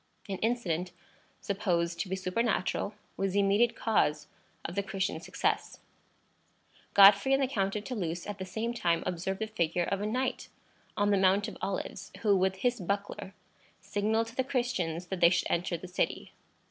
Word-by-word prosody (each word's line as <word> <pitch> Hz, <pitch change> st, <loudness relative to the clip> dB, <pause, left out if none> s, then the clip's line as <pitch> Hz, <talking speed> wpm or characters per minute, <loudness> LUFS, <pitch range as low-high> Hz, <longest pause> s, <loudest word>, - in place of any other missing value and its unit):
An 195 Hz, -2 st, -4 dB
incident, 185 Hz, -7 st, -1 dB, 0.5 s
supposed 175 Hz, -4 st, -1 dB
to 185 Hz, -, -2 dB
be 190 Hz, -, 0 dB
supernatural, 195 Hz, +1 st, -1 dB, 0.2 s
was 195 Hz, -1 st, 0 dB
the 200 Hz, -, +3 dB
immediate 200 Hz, +4 st, +3 dB
cause 150 Hz, -9 st, +1 dB, 0.4 s
of 170 Hz, -, -4 dB
the 200 Hz, -, 0 dB
Christians' 195 Hz, 0 st, -3 dB
success. -, -, -1 dB, 1.2 s
Godfrey 200 Hz, +6 st, +8 dB
and 275 Hz, -, +1 dB
the -, -, +2 dB
Count 195 Hz, -5 st, -1 dB
of 210 Hz, -, -3 dB
Toulouse 175 Hz, -9 st, -3 dB
at 205 Hz, -1 st, -6 dB
the -, -, -3 dB
same 220 Hz, +6 st, -3 dB
time 170 Hz, -8 st, +1 dB
observed 185 Hz, +2 st, -2 dB
the 220 Hz, -, -2 dB
figure 175 Hz, -5 st, 0 dB
of 195 Hz, +3 st, -1 dB
a 210 Hz, -, -1 dB
knight 255 Hz, +4 st, -2 dB, 0.5 s
on 205 Hz, 0 st, +2 dB
the 200 Hz, -, +4 dB
Mount 195 Hz, +2 st, +3 dB
of -, -, -7 dB
Olives, 195 Hz, -1 st, -4 dB
who 205 Hz, -2 st, +5 dB
with 190 Hz, 0 st, +2 dB
his 245 Hz, +5 st, 0 dB
buckler 200 Hz, +1 st, -3 dB, 0.4 s
signalled 210 Hz, +3 st, 0 dB
to 230 Hz, +1 st, -11 dB
the 260 Hz, -, +1 dB
Christians 215 Hz, -11 st, -1 dB
that 190 Hz, 0 st, -4 dB
they 170 Hz, -1 st, +7 dB
should 175 Hz, -1 st, 0 dB
enter 170 Hz, 0 st, 0 dB
the 185 Hz, -, -9 dB
city. 180 Hz, -, -2 dB
195 Hz, 175 wpm, -30 LUFS, 180-215 Hz, 1.2 s, Godfrey